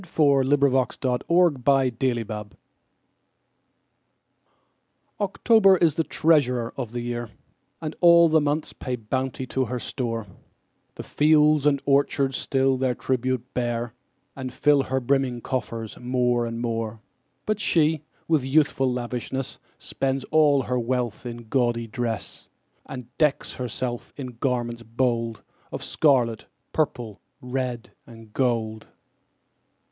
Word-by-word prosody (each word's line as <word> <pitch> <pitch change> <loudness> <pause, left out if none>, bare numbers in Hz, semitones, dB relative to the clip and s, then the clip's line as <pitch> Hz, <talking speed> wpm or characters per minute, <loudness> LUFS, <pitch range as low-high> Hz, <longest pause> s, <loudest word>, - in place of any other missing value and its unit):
Paul 140 -4 +4
Laurence 135 -2 +2
Dunbar 125 -2 -1
October 125 - +1 2.6
OCTOBER 200 -1 +4
is 165 -3 +3
the 165 - 0
treasurer 135 -9 +2
of 125 -5 -5
the 120 0 -4
year, 120 -1 -4 0.5
And 155 0 -4
all 170 -1 +7
the 160 -1 +3
months 145 +1 -1
pay 130 -2 -4
bounty 130 +3 -3
to 130 +1 -1
her 125 +2 -3
store: 115 -3 -3 0.7
The - - -7
fields 150 -1 +4
and 140 -2 +2
orchards 140 -1 +2
still 135 -1 +1
their 130 -1 0
tribute 130 -1 -1
bear, 120 -1 -2 0.4
And 130 -2 -5
fill 145 +2 +3
her 130 0 -1
brimming 130 -1 0
coffers 115 -4 -4
more 125 -1 +1
and 115 0 -5
more. 115 -2 -3 0.5
But 215 -1 -1
she, 160 -5 +2 0.3
with 160 -5 +2
youthful 135 -1 +2
lavishness, 125 +2 -4 0.2
Spends 135 0 -2
all 150 -3 +4
her 125 +1 -1
wealth 120 -1 -2
in 120 0 -7
gaudy 120 -1 +1
dress, 115 -2 -5 0.4
And 125 -1 -9
decks 150 -2 +1
herself 125 -1 -4
in 125 -4 -7
garments 120 -3 -1
bold 115 -1 -1 0.3
Of - - -5
scarlet, 125 -7 +2 0.3
purple, 120 -9 -2 0.2
red, 125 -2 -4 0.2
and 115 -2 -14
gold. 115 -4 -1
130 Hz, 120 wpm, -24 LUFS, 120-140 Hz, 2.6 s, all